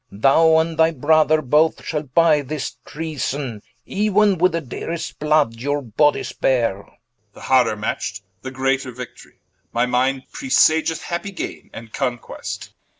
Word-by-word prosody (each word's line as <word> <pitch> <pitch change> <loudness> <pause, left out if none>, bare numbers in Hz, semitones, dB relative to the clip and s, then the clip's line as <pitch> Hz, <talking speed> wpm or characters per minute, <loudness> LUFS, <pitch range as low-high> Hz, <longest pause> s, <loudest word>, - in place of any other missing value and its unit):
Thou 150 +10 +4
and 160 0 0
thy 160 0 +6
Brother 155 +1 +3
both 150 +5 +2
shall 150 -2 -2
buy 155 +2 +3
this 145 +1 -5
Treason 145 -7 -4 0.3
Euen 205 -2 +2
with 185 +1 +3
the 165 - 0
dearest 165 +6 -6
blood 150 -5 +2
your 145 +4 -1
bodies 130 +6 +1
beare 120 -7 +1
Edw. - - -17 0.4
The - - -14
harder 125 -4 +3
matcht, 105 -1 -4 0.2
the 130 - -6
greater 135 0 -1
Victorie, 125 +1 -11 0.3
My 120 +1 +1
minde 130 +2 0
presageth 160 - +2
happy 175 +4 -4
gaine, 190 - -7
and 110 -1 -11
Conquest. 125 -4 -5
145 Hz, 145 wpm, -21 LUFS, 125-160 Hz, 0.4 s, thy